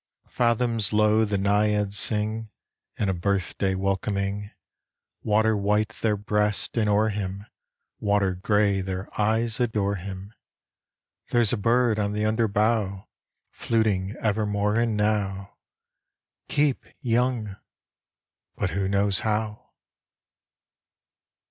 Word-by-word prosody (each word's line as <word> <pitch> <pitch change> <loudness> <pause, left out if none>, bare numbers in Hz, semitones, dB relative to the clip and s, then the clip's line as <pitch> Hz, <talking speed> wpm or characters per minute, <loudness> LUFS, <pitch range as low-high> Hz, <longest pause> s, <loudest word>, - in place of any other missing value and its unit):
Fathoms 115 -2 +1
low, 105 +1 +4
the 100 -1 -1
naiads 105 0 +1
sing 110 +1 -1 0.5
In 105 - 0
a 95 - +1
birthday 95 +1 -1
welcoming; 100 +1 -2 0.7
Water 110 +1 +2
white 105 +1 +1
their 110 -1 -1
breasts, 105 0 -1
and 110 -3 +1
o'er 105 +2 +3
him, 100 -1 -4 0.5
Water 100 -2 +1
gray, 100 +1 +1
their 95 +1 -4
eyes 110 +2 +1
adore 105 -4 0
him. 95 +3 -8 0.9
(There 120 -1 +3
's 110 - +1
a - - +3
bird 115 +1 +2
on 105 0 0
the 105 +1 -1
under 110 +1 +2
bough 105 -2 0 0.4
Fluting 105 -4 0
evermore 105 -1 0
and 115 -2 +1
now: 100 -2 -1 0.9
"Keep 145 -2 +1 0.2
young!" 115 -4 0 1.0
but - - -2
who 95 +2 -1
knows 100 0 +1
how?) 110 -1 -2
105 Hz, 110 wpm, -25 LUFS, 100-110 Hz, 1.0 s, low